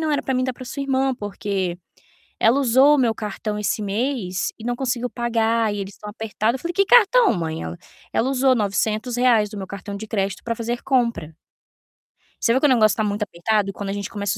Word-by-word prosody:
não 315 Hz, -1 st, 0 dB
era 290 Hz, -, 0 dB
pra 265 Hz, -, -1 dB
mim, 255 Hz, -, +1 dB
era 255 Hz, 0 st, -1 dB
pra 255 Hz, -, -10 dB
sua 280 Hz, +3 st, -5 dB
irmã, 270 Hz, -1 st, +1 dB
porque 195 Hz, -4 st, -3 dB, 0.6 s
ela 240 Hz, +5 st, +4 dB
usou 265 Hz, +3 st, +5 dB
o -, -, -1 dB
meu 235 Hz, -4 st, +2 dB
cartão 210 Hz, 0 st, -4 dB
esse 210 Hz, +1 st, -1 dB
mês 205 Hz, -3 st, -2 dB
e 220 Hz, -, -10 dB
não 245 Hz, 0 st, -1 dB
conseguiu 250 Hz, -1 st, -2 dB
pagar 230 Hz, -2 st, 0 dB
e 205 Hz, -, -4 dB
eles 195 Hz, 0 st, -7 dB
tão 210 Hz, -, -9 dB
apertado", 220 Hz, +1 st, -1 dB
eu -, -, -12 dB
falei: 345 Hz, -, -3 dB
"Que 395 Hz, +1 st, +3 dB
cartão, 480 Hz, 0 st, +6 dB
mãe?". 160 Hz, -2 st, -3 dB
Ela: 80 Hz, +1 st, -6 dB, 0.4 s
"Ela 255 Hz, -, +1 dB
usou 265 Hz, 0 st, +3 dB
R$900 220 Hz, +1 st, +1 dB
do 210 Hz, -, -7 dB
meu 190 Hz, -, -5 dB
cartão 200 Hz, +1 st, -7 dB
de 220 Hz, +2 st, -7 dB
crédito 195 Hz, -3 st, -2 dB
pra 230 Hz, -, -1 dB
fazer 235 Hz, +1 st, -3 dB
compra". 235 Hz, -, 0 dB, 1.1 s
Você 230 Hz, -, +3 dB
vê 260 Hz, -, +2 dB
que 295 Hz, -, +4 dB
o -, -, +4 dB
negócio 215 Hz, -5 st, +4 dB
tá 220 Hz, -, 0 dB
muito 205 Hz, 0 st, -2 dB
apertado 200 Hz, +2 st, 0 dB
quando 200 Hz, 0 st, -6 dB
a -, -, -2 dB
gente 200 Hz, -1 st, -4 dB
começa 205 Hz, 0 st, -2 dB
225 Hz, 220 wpm, -22 LUFS, 205-255 Hz, 1.1 s, cartão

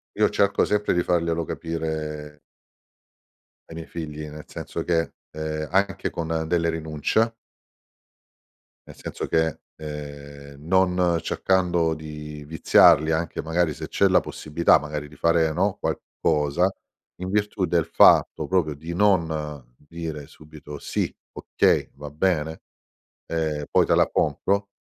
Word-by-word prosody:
Io -, -, +3 dB
cerco 100 Hz, 0 st, +2 dB
sempre 105 Hz, 0 st, +1 dB
di 90 Hz, -, +2 dB
farglielo 85 Hz, -1 st, 0 dB
capire 75 Hz, -2 st, -4 dB, 1.3 s
ai 80 Hz, -, -9 dB
miei 80 Hz, 0 st, -7 dB
figli 75 Hz, -2 st, -6 dB
nel 75 Hz, 0 st, -10 dB
senso -, -, -5 dB
che, 80 Hz, -1 st, +1 dB, 0.2 s
ehm, 75 Hz, 0 st, -4 dB
anche 100 Hz, +1 st, +1 dB
con 80 Hz, -1 st, -2 dB
delle 85 Hz, 0 st, +1 dB
rinuncia 80 Hz, +8 st, 0 dB, 1.5 s
nel -, -, -12 dB
senso -, -, -6 dB
che, 80 Hz, -1 st, +1 dB, 0.2 s
ehm, 70 Hz, -1 st, -9 dB
non 90 Hz, -1 st, +2 dB
cercando 90 Hz, -3 st, +1 dB
di 75 Hz, -1 st, -8 dB
viziarli, 80 Hz, 0 st, +5 dB
anche 80 Hz, 0 st, -1 dB
magari 80 Hz, 0 st, 0 dB
se -, -, -7 dB
c'è 100 Hz, -, +3 dB
la 95 Hz, -1 st, +4 dB
possibilità 80 Hz, +2 st, +2 dB
magari 75 Hz, +1 st, -5 dB
di 75 Hz, -, -16 dB
fare, 85 Hz, 0 st, +3 dB
no, 95 Hz, +5 st, 0 dB
qualcosa, 75 Hz, +6 st, 0 dB, 0.5 s
in 90 Hz, +1 st, -4 dB
virtù 105 Hz, -1 st, 0 dB
del 85 Hz, -2 st, +1 dB
fatto -, -, +5 dB
proprio 85 Hz, -5 st, +1 dB
di 80 Hz, +4 st, -7 dB
non 80 Hz, -9 st, 0 dB
dire 80 Hz, -1 st, -7 dB
subito: 75 Hz, -1 st, -11 dB
"Sì, -, -, -2 dB, 0.2 s
okay, -, -, +1 dB
va 75 Hz, +1 st, -8 dB
bene, 80 Hz, 0 st, -1 dB, 0.7 s
ehm, 80 Hz, -3 st, -2 dB
poi -, -, +4 dB
te -, -, +2 dB
la -, -, +4 dB
compro." 100 Hz, 0 st, 0 dB
80 Hz, 130 wpm, -24 LUFS, 75-85 Hz, 1.5 s, viziarli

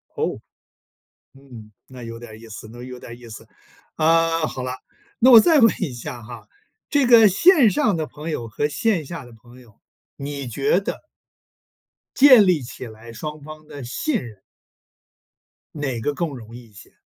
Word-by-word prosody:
哦， -, -, -2 dB, 1.0 s
嗯， 125 Hz, -6 st, -14 dB, 0.2 s
那 130 Hz, -2 st, -11 dB
有 115 Hz, 0 st, -8 dB
点 115 Hz, -2 st, -12 dB
意 115 Hz, -, -13 dB
思 110 Hz, 0 st, -10 dB
那 120 Hz, +1 st, -11 dB
有 125 Hz, 0 st, -9 dB
点 120 Hz, -1 st, -11 dB
意 120 Hz, -1 st, -13 dB
思。 110 Hz, -, -11 dB, 0.5 s
啊， 165 Hz, +1 st, +2 dB
好 130 Hz, -, -6 dB
了， 125 Hz, -, -4 dB, 0.5 s
那 255 Hz, +2 st, +5 dB
我 235 Hz, -3 st, +10 dB
再 320 Hz, +7 st, +4 dB
问 230 Hz, -4 st, +6 dB
一 140 Hz, -, -2 dB
下 120 Hz, 0 st, -8 dB
哈， 120 Hz, +2 st, -11 dB, 0.4 s
这 285 Hz, -3 st, +2 dB
个 230 Hz, -3 st, +7 dB
线 270 Hz, -, +5 dB
上 220 Hz, -, +1 dB
的 160 Hz, -1 st, -3 dB
朋 150 Hz, +2 st, -8 dB
友 120 Hz, -7 st, -4 dB
和 140 Hz, +6 st, -2 dB
线 190 Hz, +1 st, 0 dB
下 155 Hz, 0 st, -8 dB
的 120 Hz, -, -15 dB
朋 120 Hz, +3 st, -17 dB
友， 115 Hz, -4 st, -21 dB, 0.4 s
你 140 Hz, -1 st, -6 dB
觉 430 Hz, -, +1 dB
得 -, -, -6 dB, 1.1 s
建 260 Hz, -6 st, +8 dB
立 180 Hz, -5 st, +2 dB
起 125 Hz, +1 st, -9 dB
来 110 Hz, +1 st, -13 dB
双 150 Hz, +4 st, -7 dB
方 155 Hz, +1 st, -12 dB
的 145 Hz, -2 st, -9 dB
信 245 Hz, -, -3 dB
任。 110 Hz, -5 st, -12 dB, 1.3 s
哪 140 Hz, -6 st, -3 dB
个 145 Hz, +6 st, -1 dB
更 170 Hz, +3 st, -2 dB
容 120 Hz, -5 st, -11 dB
易 120 Hz, -2 st, -13 dB
一 -, -, -26 dB
些？ 95 Hz, -, -16 dB
140 Hz, 190 characters per minute, -21 LUFS, 120-170 Hz, 1.3 s, 我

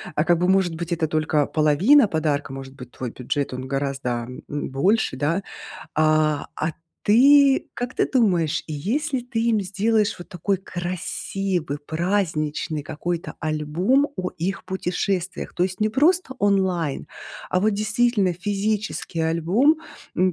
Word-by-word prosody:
А 150 Hz, -, +2 dB
как 175 Hz, +1 st, +3 dB
бы, 180 Hz, -, +2 dB
может 190 Hz, -2 st, +3 dB
быть, 170 Hz, +1 st, -3 dB
это 165 Hz, -1 st, 0 dB
только 155 Hz, -1 st, +1 dB
половина 170 Hz, -, +4 dB
подарка, 150 Hz, -5 st, -1 dB
может 135 Hz, 0 st, -8 dB
быть, 125 Hz, -2 st, -11 dB
твой 125 Hz, -3 st, -5 dB
бюджет, 130 Hz, +3 st, -3 dB
он 130 Hz, +1 st, -5 dB
гораздо, 135 Hz, -3 st, -2 dB, 0.2 s
м, 145 Hz, -, -4 dB
больше, 190 Hz, +12 st, +1 dB
да? 165 Hz, +7 st, 0 dB, 0.5 s
А, 155 Hz, -1 st, +2 dB
а 160 Hz, +1 st, -1 dB, 0.3 s
ты 275 Hz, +5 st, +6 dB
как 245 Hz, +1 st, -4 dB
ты -, -, +1 dB
думаешь, 180 Hz, -, +2 dB
если 245 Hz, -, -1 dB
ты 240 Hz, -2 st, -3 dB
им 225 Hz, -3 st, +3 dB
сделаешь 205 Hz, +3 st, +1 dB
вот 175 Hz, -, -10 dB
такой 195 Hz, +1 st, -1 dB
красивый 180 Hz, -2 st, -3 dB
праздничный 160 Hz, -2 st, -1 dB
какой-то 170 Hz, +4 st, -4 dB
альбом 165 Hz, -, +1 dB
о 185 Hz, -1 st, -2 dB
их 185 Hz, +3 st, -3 dB
путешествиях? 185 Hz, 0 st, -2 dB
То 175 Hz, -, 0 dB
есть 185 Hz, 0 st, -1 dB
не 215 Hz, -, +3 dB
просто 295 Hz, +4 st, +2 dB
онлайн, 190 Hz, -7 st, +1 dB, 0.4 s
а 185 Hz, -, +1 dB
вот 215 Hz, +3 st, +3 dB
действительно 215 Hz, -2 st, +1 dB
физический 205 Hz, -1 st, -2 dB
альбом. 170 Hz, -, +3 dB, 0.4 s
М, 185 Hz, +1 st, +3 dB
180 Hz, 140 wpm, -23 LUFS, 155-210 Hz, 0.5 s, ты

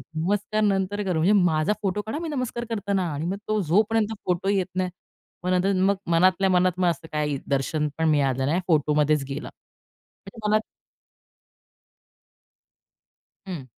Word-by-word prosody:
नमस्कार 205 Hz, +6 st, 0 dB
नंतर 205 Hz, 0 st, 0 dB
करू, 180 Hz, -4 st, -1 dB
म्हणजे 180 Hz, +6 st, +4 dB
माझा 160 Hz, +2 st, +2 dB
फोटो 200 Hz, +1 st, -1 dB
काढा 220 Hz, +8 st, -5 dB
मी 335 Hz, -1 st, -4 dB
नमस्कार 255 Hz, -4 st, -3 dB
करताना 200 Hz, -4 st, -1 dB
आणि 145 Hz, +3 st, -3 dB
मग 190 Hz, +3 st, -2 dB
तो 215 Hz, 0 st, +1 dB
जो 190 Hz, +7 st, +5 dB
पर्यंत 225 Hz, -1 st, +1 dB
फोटो 180 Hz, +2 st, 0 dB
येत 195 Hz, -2 st, +2 dB
नाही. 185 Hz, -1 st, 0 dB, 0.5 s
मग 180 Hz, -, -1 dB
नंतर 185 Hz, +2 st, +2 dB
मग 200 Hz, +1 st, +3 dB, 0.2 s
मनातल्या 185 Hz, +3 st, +4 dB
मनात 180 Hz, 0 st, +2 dB
मग 180 Hz, -, +3 dB
असं 165 Hz, -1 st, -4 dB
काही 150 Hz, -2 st, -1 dB
दर्शन 145 Hz, +3 st, 0 dB
पण 160 Hz, 0 st, +1 dB
मिळालं 135 Hz, -3 st, +2 dB
नाही 160 Hz, +6 st, +1 dB
फोटोमध्येच 150 Hz, -2 st, +2 dB
गेला. 140 Hz, +2 st, -5 dB
म्हणजे 225 Hz, -3 st, -13 dB
मनात 215 Hz, +1 st, +3 dB, 2.9 s
हं. 170 Hz, -8 st, -6 dB
185 Hz, 150 wpm, -25 LUFS, 155-205 Hz, 2.9 s, जो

